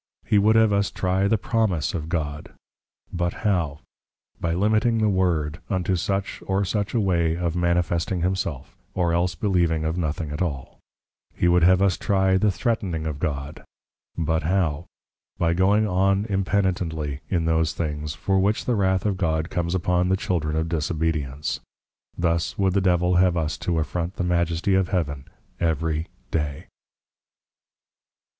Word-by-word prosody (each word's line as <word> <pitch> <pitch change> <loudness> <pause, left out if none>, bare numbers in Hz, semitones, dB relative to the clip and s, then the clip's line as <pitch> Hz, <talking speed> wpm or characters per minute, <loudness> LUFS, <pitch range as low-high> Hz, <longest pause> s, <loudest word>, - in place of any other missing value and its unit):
He 105 - +3
would 110 +2 +4
have 110 -2 +5
us 100 0 +2
trie 95 +1 0
the 110 - +3
Promise 100 -6 0
of 80 -3 -4
God; 75 -4 -3 0.6
but 85 0 -1
how? 85 -8 0 0.6
By 85 -1 -1
Limiting 110 +4 +2
the 110 -1 +2
Lord, 85 -5 0
unto 95 -1 0
such 95 +3 -2
or 95 +1 +1
such 105 +3 -2
a - - +3
way 85 -5 +1
of 85 -1 -1
manifesting 85 0 0
Himself, 90 -7 -2 0.2
or 85 -2 +1
else 90 +1 +1
believing 85 -3 +1
of 80 +3 -1
nothing 80 -1 -2
at 75 - -4
all. 70 -8 -4 0.6
He 90 - +1
would 90 0 +4
have 95 +2 +5
us 95 -2 +2
trie 95 -1 +2
the 105 - +2
Threatning 95 -6 -1
of 75 -3 -3
God; 70 0 -4 0.5
but 80 0 0
how? 85 -2 0 0.5
By 85 0 +2
going 100 +4 +3
on 95 +2 +2
impenitently 90 -7 -1
in 85 -3 0
those 80 -1 +1
things, 75 -2 -3
for 95 +5 +1
which 100 +3 +1
the 125 - +1
Wrath 95 -3 +1
of 100 -3 0
God 80 -2 -1
comes 85 0 -1
upon 90 0 +1
the 95 - +2
Children 80 -5 -1
of 80 +1 0
Disobedience. 75 -3 -2 0.6
Thus 85 -1 0
would 95 -2 +2
the 100 - +2
Devil 90 -1 +2
have 90 -1 +3
us 80 -2 -1
to 85 -2 -1
affront 85 +3 -2
the - - -2
Majesty 85 +1 +1
of 95 -1 +3
Heaven 75 -8 -2 0.3
every 80 0 0 0.2
day. 75 -3 -3
90 Hz, 160 wpm, -24 LUFS, 80-95 Hz, 0.6 s, have